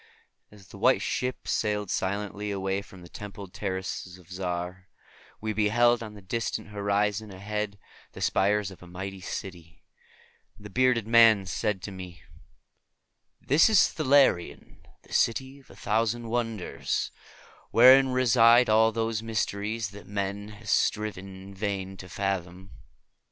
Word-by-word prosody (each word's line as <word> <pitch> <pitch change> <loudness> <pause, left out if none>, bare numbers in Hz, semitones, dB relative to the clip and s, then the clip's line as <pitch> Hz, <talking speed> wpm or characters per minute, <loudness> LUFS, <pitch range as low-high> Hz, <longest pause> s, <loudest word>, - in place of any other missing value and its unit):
As 100 -3 -17
the - - -12
White - - +3
Ship 125 0 -3
sailed 105 -3 -1
silently 105 +2 -2
away 95 0 -2
from 95 -2 -14
the - - -11
templed 100 0 -9
terraces 95 -2 -4
of 90 -1 -19
Zar, 90 0 -4 0.5
we 110 0 -3
beheld 115 +3 +3
on 110 -2 -8
the 100 - -13
distant 115 +2 -3
horizon 105 +1 -1
ahead 100 +1 -4 0.4
the - - -10
spires 100 0 +1
of 95 - -14
a 90 - -12
mighty 95 +2 -7
city; 85 -3 -8 0.7
and 105 - -16
the 105 - -9
bearded 125 -2 +2
man 115 -3 +6
said 95 +1 -2
to 100 - -5
me, 90 -2 -10 1.2
"This 150 - +4
is 215 -4 +5
Thalarion, 135 - +2 0.3
the - - -14
City 130 +3 0
of 135 - -23
a - - -14
Thousand 115 +3 -1
Wonders, 115 -5 -2 0.6
wherein 130 +3 +7
reside 120 -1 +5
all 110 +1 +5
those 115 -1 -2
mysteries 110 -1 -2
that 100 0 -12
man 100 0 -3
has 105 0 -7
striven 105 -3 0 0.2
in 100 +1 -11
vain 95 -1 -3
to 95 - -10
fathom." 95 -1 -4
105 Hz, 140 wpm, -27 LUFS, 95-115 Hz, 1.2 s, wherein